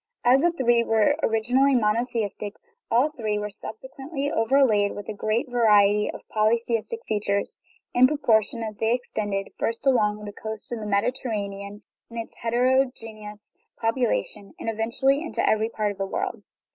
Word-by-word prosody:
All 250 +2 +6
the 345 +4 +3
three 240 -7 +2
were 225 -2 +3
originally 250 +5 +2
monotheistic; 215 -2 -1 0.3
all 255 +6 +3
three 215 -7 -2
were 210 0 -4
sub 220 - -8
sequently 275 +3 -5
overlaid 225 -4 +3
with 205 - -7
a - - -2
great 215 +5 -1
variety 210 -4 +4
of - - -12
polytheistic 230 - 0
features, 200 -2 -1 0.3
in 255 +1 +6
proportion 230 -5 +1
as 215 -2 -5
they 225 +3 +2
extended, 205 -5 -3
first 230 +3 -2
along 210 -5 +2
the 205 - -7
coast 220 +2 -7
of 240 - -3
the 215 - -5
Mediterranean 200 -2 -2 0.3
with 235 - -9
its 225 - -8
heterogeneous 230 -4 -1 0.3
population, 225 -3 -1
and 225 - -2
eventually 235 +6 +1
into 330 - -2
every 220 +1 +2
part 215 -2 -1
of 200 - -11
the 195 - -1
world. - - -3
225 Hz, 155 wpm, -25 LUFS, 210-250 Hz, 0.3 s, All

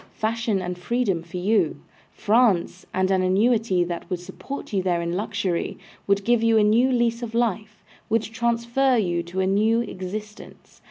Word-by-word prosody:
Fashion 220 -3 -1
and 180 0 -5
freedom 205 -3 0
for 170 +2 -8
you. 205 +4 +1 0.3
France, 205 -5 +1
and 185 +1 0
an 190 -1 +3
annuity 195 0 +2
that 175 +1 -5
would 180 -2 -2
support 190 +9 -8
you 195 - +2
there 180 -2 0
in 170 0 -2
luxury, 200 -2 -2 0.3
would 200 0 +1
give 240 -1 +3
you 230 -1 +3
a 215 - +5
new 230 +5 +4
lease 235 -1 +1
of 230 -1 -5
life, 215 -3 -1 0.3
would 225 0 +2
transfer 235 +3 +1
you 175 -5 0
to 175 +3 -4
a - - +1
new 215 +4 +2
existence. 210 +1 -8
210 Hz, 170 wpm, -24 LUFS, 185-230 Hz, 0.3 s, a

